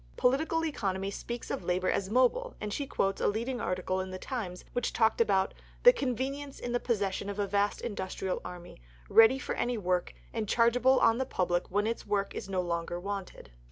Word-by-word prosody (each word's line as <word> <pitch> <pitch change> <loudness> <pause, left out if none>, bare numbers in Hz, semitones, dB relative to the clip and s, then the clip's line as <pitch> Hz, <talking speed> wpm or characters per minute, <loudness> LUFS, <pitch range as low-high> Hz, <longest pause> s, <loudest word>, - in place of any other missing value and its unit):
Political 315 +6 +2
economy 195 -9 -2
speaks 240 +3 -6
of - - -3
labour 180 +1 +1
as 190 - -1
mobile, 260 - +2
and 210 -1 -4
she 280 +3 -3
quotes 195 -5 0
a - - +3
leading 235 +4 -1
article 185 +1 -1
in 185 - -5
the 185 - -5
Times 185 -6 -5
which 245 -1 0
had - - -5
talked 225 0 +3
about 195 -4 +2 0.3
"the - - +10
convenience 275 - -3
in 245 - -4
the 245 - +1
possession 200 -4 -1
of 200 - -5
a 205 - +1
vast 200 +1 0
industrial 190 -3 -3
army, 175 - -9 0.3
ready 225 +4 +7
for - - -3
any 240 0 -1
work, 180 -3 -1 0.2
and 220 -3 -2
chargeable 245 +3 +4
on 230 +2 +4
the 265 - 0
public 175 -4 0
when 205 +3 +1
its 230 +1 -2
work 200 -1 0
is - - -6
no 185 -1 0
longer 170 0 -2
wanted." 195 - -6
205 Hz, 200 wpm, -30 LUFS, 190-245 Hz, 0.3 s, the